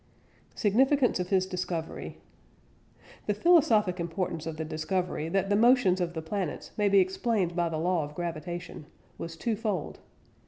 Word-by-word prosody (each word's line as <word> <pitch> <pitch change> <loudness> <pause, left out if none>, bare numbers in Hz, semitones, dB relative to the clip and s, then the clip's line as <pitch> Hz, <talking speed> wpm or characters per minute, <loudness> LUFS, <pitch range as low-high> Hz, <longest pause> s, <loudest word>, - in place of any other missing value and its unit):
SIGNIFICANCE 255 +4 +3
OF 180 - -2
HIS 185 -1 +2
DISCOVERY. 180 -3 -4 1.1
The 210 - +1
philosophic 220 - +4
importance 170 -1 -3
of 160 -1 -5
the 160 - -3
discovery 160 +1 -2
that 195 +2 0
the - - +4
motions 230 -5 +4
of 175 -1 -2
the 160 - -4
planets 180 -1 -4
may 205 -1 +2
be 200 - +4
explained 190 -1 0
by 175 -1 +1
the 160 - -3
"law 170 0 +1
of 145 +1 -8
gravitation" 175 -1 -5 0.3
was 165 0 -6
twofold. 215 -7 -2
180 Hz, 150 wpm, -28 LUFS, 165-205 Hz, 1.1 s, philosophic